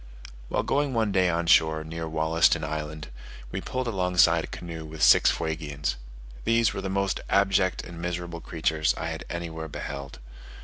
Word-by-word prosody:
While - - 0
going 140 -2 0
one 110 -3 +1
day 95 -1 +3
on 85 0 0
shore 80 -1 +4
near 80 +1 -5
Wollaston 80 +1 +2
Island, 75 0 -5 0.4
we - - -3
pulled 130 -1 -3
alongside 90 -5 +3
a - - -6
canoe 85 -2 -7
with 80 0 -5
six - - +7
Fuegians. 75 -3 -2 0.5
These 115 -1 +3
were 95 - -4
the 95 - -3
most 100 0 0
abject 100 -2 +2
and 85 -1 -9
miserable 85 -1 -4
creatures 80 -1 0
I - - -3
anywhere 80 -2 -5
beheld. 70 -2 -6
85 Hz, 160 wpm, -26 LUFS, 80-95 Hz, 0.5 s, six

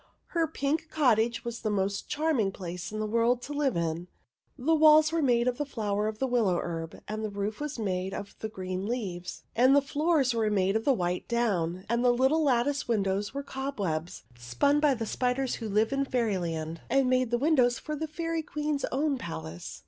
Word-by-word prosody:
Her 335 -2 +1
pink 315 +1 -2
cot 265 -10 +3
tage 235 +1 -1
was 235 -1 -4
the 215 - -1
most 200 -1 -1
charming 295 -10 +1
place 180 -1 -6
in 215 - -4
the 215 - -1
world 230 +3 +2
to 290 - -6
live 285 -7 0
in; 170 +1 -2 0.5
the 295 +5 +1
walls 310 0 +6
were 330 0 +1
made 240 -3 +3
of 250 +1 0
the - - +1
flower 210 -5 -1
of 215 0 -4
the 265 - 0
willow 230 -8 +2
herb, 165 -1 -5
and 215 +1 -4
the 215 - -2
roof 205 +1 -3
was 300 -1 -4
made 190 -3 -2
of 200 +1 -6
the 220 - -4
green 185 -1 -4
leaves, 185 -7 -4
and 255 +4 +5
the - - +7
floors 285 -2 +1
were 225 -2 +1
made 195 -1 +1
of 225 - 0
the 280 - +5
white 180 -5 -2
down; 190 -7 0
and 235 +2 +1
all 250 - +5
the 240 - -1
little 310 +5 +4
lattice 280 0 +1
windows 200 0 0
were 280 - -3
cobwebs, 200 - -3
spun 120 - +1
by 295 -3 +3
the 225 -1 -3
spiders 250 +3 -1
who 225 -2 -5
live 215 +5 +2
in 275 0 +1
Fairyland 175 -11 -2
and 270 +1 +3
make 255 -1 +2
the 240 - +1
windows 255 -3 +3
for 305 - -5
the 315 +2 -3
Fairy 330 +1 -2
Queen's 300 -1 -2
own 280 0 0
palace. 80 - -7
235 Hz, 210 wpm, -28 LUFS, 195-280 Hz, 0.5 s, the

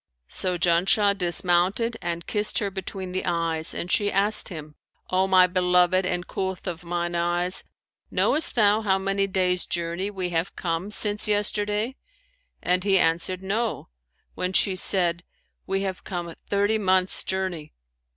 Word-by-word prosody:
So 180 -1 -1
Janshah 185 +4 +3
dismounted 185 +5 +1
and 170 -1 -4
kissed 210 -1 +1
her 200 -2 -1
between 190 -1 -6
the 185 - -2
eyes; 165 -2 0
and 180 - -4
she 205 -1 +2
asked 205 +2 +2
him, 155 -4 -8 0.4
'O 185 +1 +2
my 185 -1 +6
beloved 180 0 +2
and 180 0 -1
coolth 190 -1 -4
of 175 -2 -5
mine 175 0 -3
eyes, 175 +1 0 0.5
knowest 310 - +2
thou 210 -1 +4
how 195 -3 +2
many 195 +1 0
days' 185 -2 0
journey 170 +3 -2
we 190 -3 -4
have 170 +2 -2
come 170 +2 -3
since 210 0 +1
yesterday?'; 210 +3 0 0.7
and 180 0 +1
he 195 -1 +3
answered, 175 +2 0
'No,' 220 - -2 0.4
when 180 +1 -3
she 190 0 +2
said, 175 -2 +1 0.5
'We 195 +1 -1
have 190 -1 -4
come 175 -2 -5
thirty 205 +2 +1
months' 185 -2 +1
journey.' 185 -5 -3
185 Hz, 150 wpm, -25 LUFS, 175-200 Hz, 0.7 s, my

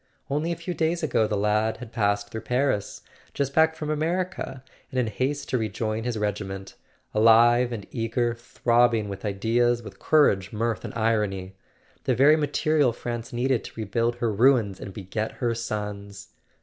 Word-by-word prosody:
Only 150 +4 0
a - - -1
few 170 +2 -5
days 165 +1 0
ago 115 -8 +2
the 105 - -1
lad 105 +2 +1
had 120 -2 -10
passed 100 -3 0
through 110 - -5
Paris, 125 -5 -1 0.3
just 140 -1 -1
back 160 +1 +4
from 155 -1 -4
America, 160 -3 -2 0.3
and 130 - -2
in 125 - +2
haste 135 +6 -2
to 130 - +1
rejoin 110 +1 -2
his 120 -2 -2
regi¬ 105 -1 -1
ment; 95 0 -7 0.4
alive 120 +3 +5
and 110 -4 -5
eager, 120 0 0
throbbing 120 -2 +1
with 100 -1 -7
ideas, 115 +4 +1
with 110 - -11
cour¬ 150 -9 +4
age, 95 0 -10
mirth 115 +1 -2
and - - -7
irony—the 100 -4 -2
very 145 +4 +6
material 150 -2 +2
France 120 0 -5
needed 125 0 0
to - - -10
rebuild 115 +3 0
her 120 -2 -1
ruins 115 -4 +3
and 100 - -7
beget 105 +3 -4
her 120 -2 -1
sons! 105 -2 -5
115 Hz, 170 wpm, -25 LUFS, 105-130 Hz, 0.4 s, very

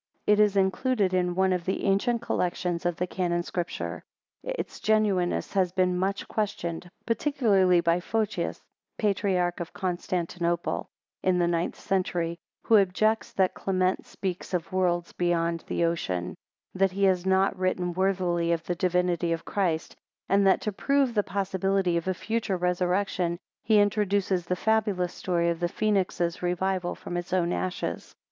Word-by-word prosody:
It 210 0 +4
is 210 -1 +4
included 195 +1 +1
in 180 -1 +1
one 190 0 +3
of 180 -2 -1
the 190 - -2
ancient 230 +4 +1
collections 175 -3 -1
of 175 - -1
the 180 - -1
Canon 175 -1 -1
Scripture. 175 -1 -4 0.4
Its - - -5
genuineness 205 -5 +1
has 185 -3 +2
been 180 -1 +1
much 190 +2 -1
questioned, 180 -5 -3 0.2
particularly 210 - +3
by 170 +1 +2
Photius, 215 +3 -2 0.3
patriarch 185 -4 +1
of 170 0 -6
Constantinople 175 -1 -2 0.3
in 185 -1 +2
the 175 -1 +2
ninth 170 0 -1
century, 175 -3 -1 0.2
who 225 - +5
objects 215 +4 +1
that 190 -1 +2
Clement 185 -1 0
speaks 185 -1 -4
of 170 0 -3
worlds 175 -2 0
beyond 170 -1 0
the 170 - +1
ocean: 95 - -2 0.4
that 190 0 +2
he 200 +1 -1
has 185 -2 +3
not 190 +1 +2
written 185 -1 -1
worthily 180 -2 +1
of 165 -1 0
the 175 - -1
divinity 180 -1 +1
of 165 0 -2
Christ; 175 -6 -1 0.3
and 195 0 +3
that 190 - +4
to 210 - -2
prove 275 +4 +1
the 210 - +3
possibility 195 -2 0
of 170 +1 -1
a 185 - 0
future 220 -1 -2
resurrection, 180 0 0 0.3
he 215 -1 +5
introduces 200 -3 +1
the 180 - 0
fabulous 205 -3 +1
story 170 -2 0
of 165 - -4
the 175 - +1
phoenix's 185 -4 0
revival 180 0 -1
from 175 - -7
its 175 0 -5
own 175 -2 +2
ashes. 185 -1 -3
185 Hz, 155 wpm, -27 LUFS, 175-195 Hz, 0.4 s, who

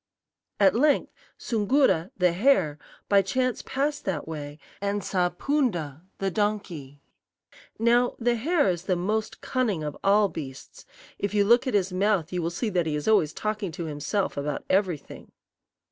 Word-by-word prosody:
"At 195 -2 +5
length 285 +6 +2 0.2
Soongoo'ra, 220 - +2
the 180 -2 +3
hare, 180 - +2 0.3
by 200 -1 +5
chance 255 +5 -1
passed 285 +2 -2
that 165 -7 -2
way, 145 -2 -6 0.2
and 200 0 -1
saw 180 -1 +1
Poon'da, 175 - -1 0.2
the 195 0 -1
donkey. 175 -10 -3 0.7
"Now, 240 +2 +3
the 240 0 +1
hare 290 - +1
is 175 -1 -1
the 185 - +1
most 210 +5 -2
cunning 220 -11 -1
of 150 -1 -4
all 205 +1 +4
beasts 140 -7 -9 0.3
if 205 +1 -2
you 205 -1 +4
look 240 +5 +4
at 255 - 0
his 190 -2 +1
mouth 185 -3 +1
you 180 - -1
will 165 - -1
see 215 +7 -2
that 175 -3 0
he 150 - -1
is 150 - -4
always 195 -9 +4
talking 210 -2 -3
to 170 - -5
himself 150 +6 -2
about 145 0 -3
everything. 185 -6 -1
195 Hz, 160 wpm, -26 LUFS, 165-220 Hz, 0.7 s, At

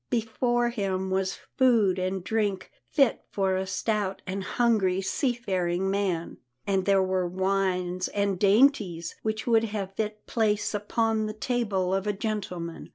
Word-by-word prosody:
Before 240 +1 +1
him 190 -4 -2
was 190 0 0 0.2
food 225 -8 +4
and 185 0 -2
drink 205 -3 -1 0.2
fit 275 -6 +3
for 190 -1 0
a 190 0 -2
stout 195 +1 -1
and 190 +1 -3
hungry 205 -5 +2
sea 220 +7 0
faring 190 -5 -1
man, 190 -4 -1 0.3
and 195 -2 +1
there 195 -1 +4
were 185 -1 0
wines 185 -1 0
and 200 -2 -1
dainties 200 - +3
which 220 0 -2
would 230 -2 +3
have 205 -3 -3
had 195 - -30
fit 215 0 -3
place 215 -2 0
upon 220 +1 0
the 215 - -4
table 215 -5 -1
of 195 +1 -1
a 210 - +1
gentleman. 190 -5 -4
195 Hz, 155 wpm, -27 LUFS, 185-220 Hz, 0.3 s, food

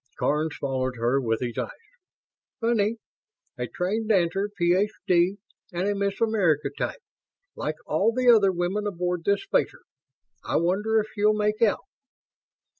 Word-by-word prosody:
Karns 155 +1 0
followed 130 -2 -2
her 120 +4 +1
with 115 -3 -1
his 120 -2 -3
eyes. - - -2 0.9
"Funny. 225 -2 +1 0.6
A - - -2
trained 215 +5 -2
dancer 195 0 +2
Ph.D. 180 0 +2 0.3
And 180 +2 -1
a 205 - +1
Miss 200 0 -2
America 195 -10 +2
type, 475 - -4 0.5
like 155 - -3
all 195 +9 +2
the 250 +2 -1
other 215 -5 +6
women 185 +4 -1
aboard 180 -2 -2
this 200 0 +2
spacer. 485 +5 0 0.6
I - - -3
wonder 205 +6 +2
if 215 0 -3
she'll 210 +1 +3
make 210 +1 0
out." 220 -3 +2
195 Hz, 140 wpm, -25 LUFS, 170-215 Hz, 0.9 s, other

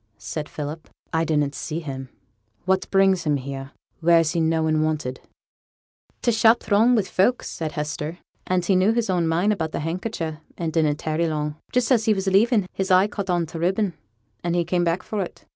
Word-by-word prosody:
said 150 -2 -5
Philip; 150 +2 -6 0.2
'I 165 0 +2
didn't 150 -3 +1
see 155 +2 -4
him. 135 -5 -6 0.6
What 190 0 +1
brings 195 -2 +3
him 150 -3 +1
here, 135 0 -6 0.3
where 170 0 +5
he's 165 -1 +2
noan 160 -1 +2
wanted?' 155 -5 -1 1.0
'T' 240 - +3
shop 225 +1 +5
were - - -15
throng 220 +4 +4
wi' 215 - +3
folk,' 195 +6 +1
said 160 -2 -5
Hester, 150 +2 -4 0.3
'and 180 -1 +1
he 195 - +3
knew 190 +4 +4
his 230 -4 0
own 175 -2 +1
mind 175 +6 +2
about 160 -5 -3
the - - -2
handkercher, 165 -1 -3 0.2
and 165 -2 -3
didn't 155 -3 +2
tarry 155 +2 -1
long. 150 -1 -2 0.2
Just 250 0 +1
as 230 -4 +4
he 220 -2 +3
was 190 0 -2
leaving, 205 +2 +3
his 190 0 -2
eye 185 +1 +6
caught 200 -2 -5
on 175 -2 +1
t' 165 +1 -7
ribbon, 190 +2 +1 0.5
and 170 0 0
he 175 -1 +1
came 175 +1 +1
back 170 +1 0
for 210 -2 -3
it. 180 - -7
170 Hz, 200 wpm, -23 LUFS, 155-195 Hz, 1.0 s, eye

